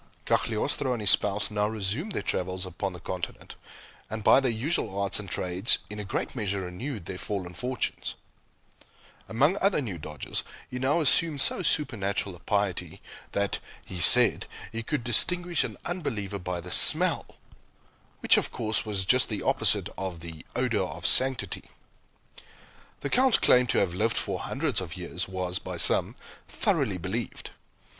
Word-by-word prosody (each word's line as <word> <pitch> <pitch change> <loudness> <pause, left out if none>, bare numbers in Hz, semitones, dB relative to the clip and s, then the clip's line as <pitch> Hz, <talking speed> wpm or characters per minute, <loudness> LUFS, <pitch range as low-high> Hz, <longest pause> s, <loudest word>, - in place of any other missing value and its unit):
Cagliostro 125 +4 0
and 120 - -4
his 105 - +5
spouse 105 +1 +1
now 105 0 0
resumed 110 - -2
their - - -3
travels 90 0 -2
upon 95 +2 -4
the 90 - -9
Continent, 90 0 -7 0.5
and, 110 0 -5
by - - +6
their 135 -2 0
usual 115 - -2
arts 100 0 0
and 100 -3 -8
trades, 90 +6 0
in 105 - -7
a - - -4
great 95 - -4
measure 100 -4 -2
renewed 95 - -6
their 90 +1 -6
fallen 95 -4 -4
fortunes. 125 +7 -4 1.1
Among 145 - +2
other 195 -3 +2
new 105 - -5
dodges, - - -5 0.3
he 125 - -5
now 140 +6 +1
assumed 155 0 +5
so - - +2
supernatural 100 - +1
a - - -16
piety 95 -3 -2 0.3
that 100 0 -1 0.3
(he 90 - -7
said) - - +7 0.2
he 115 - -4
could 120 +2 -3
distinguish 175 +9 +2
an - - -6
unbeliever 110 - -4
by 90 -1 -4
the 90 +1 -10
smell! - - +3 0.8
which, - - +5
of - - 0
course, 110 -1 -1
was 100 -3 -2
just 125 +6 +4
the 105 -3 -4
opposite - - +2
of 95 -4 -5
the 80 -2 -10
"odor - - 0
of - - -5
sanctity." 130 -1 +2 1.4
The 140 - -4
Count's 260 -1 +5
claim 125 0 +4
to - - 0
have 95 -3 +1
lived 110 +5 0
for 95 -3 -2
hundreds 140 -5 -2
of 90 0 -7
years 90 0 -4
was, 90 -1 -3
by - - -7
some, - - +3 0.3
thoroughly 95 -3 -1
believed. 95 +6 -5
105 Hz, 160 wpm, -27 LUFS, 95-130 Hz, 1.4 s, said